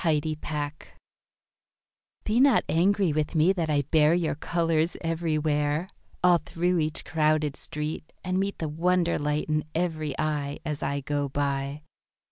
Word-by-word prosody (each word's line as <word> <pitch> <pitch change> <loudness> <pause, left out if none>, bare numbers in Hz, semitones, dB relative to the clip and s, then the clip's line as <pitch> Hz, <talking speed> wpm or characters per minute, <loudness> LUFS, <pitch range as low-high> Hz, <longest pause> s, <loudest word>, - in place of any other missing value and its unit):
Apology 155 -2 +1 1.9
Be 220 +3 +1
not 275 0 +5
angry 185 0 +2
with 155 +2 -1
me 165 +4 +4
that 170 -4 -2
I 145 -1 +2
bear 155 +3 +4
Your 175 -2 0
colours 165 +1 0
everywhere, 155 -1 0 0.3
All 175 -1 +6
through 175 +3 0
each 155 0 -2
crowded 155 -2 +1
street, 150 +1 -4
And 185 0 0
meet 200 +1 -1
The 160 - -3
wonder 170 +3 +1
light 150 0 -1
in 155 -1 0
every 155 -4 -1
eye, 145 -2 -1
As 150 -2 -3
I 140 +1 -1
go 145 0 -2
by. 140 +1 -2
155 Hz, 140 wpm, -27 LUFS, 150-170 Hz, 1.9 s, All